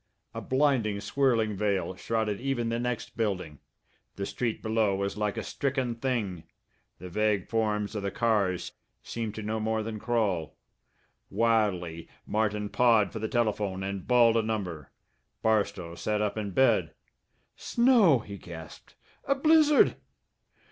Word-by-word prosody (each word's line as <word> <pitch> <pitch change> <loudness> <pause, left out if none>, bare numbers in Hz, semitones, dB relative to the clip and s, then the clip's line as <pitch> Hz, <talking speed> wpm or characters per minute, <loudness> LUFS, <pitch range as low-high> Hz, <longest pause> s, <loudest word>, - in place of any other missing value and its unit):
A - - -5
blinding, 130 -7 +1
swirling 115 -4 +1
veil 100 -2 -1
shrouded 110 0 -2
even 125 -4 -1
the 115 0 -1
next 125 -1 -3
building. 90 -9 -2 0.6
The 100 - -3
street 115 +2 -3
below 110 -3 +1
was 100 0 -2
like 105 -1 -2
a - - -2
stricken 130 -3 -1
thing; 115 -8 -2 0.5
the 90 - -9
vague 105 +1 0
forms 105 -2 0
of 105 - -3
the 100 - -2
cars 100 -6 0 0.3
seemed 115 -2 -4
to 110 - -5
no 110 +1 -2
more 110 0 -1
than 110 -1 -5
crawl. 105 -9 -1 0.7
Wildly 100 -8 0 0.2
Martin 105 -1 0
pawed 115 -4 +3
for 110 - -4
the 110 - -2
telephone 105 -5 -1
and 95 -1 -5
bawled 120 -2 +5
a - - +3
number. 95 -9 -4 0.5
Barstow 100 -6 0
sat 105 +4 -2
up 105 -1 -1
in 105 -2 -3
bed. 130 +7 +2 0.6
"Snow!" 235 - +4
he 100 -1 -8
gasped. 80 -2 -11 0.3
"A 275 - +2
blizzard!" 305 0 +5
110 Hz, 140 wpm, -28 LUFS, 100-115 Hz, 0.7 s, bawled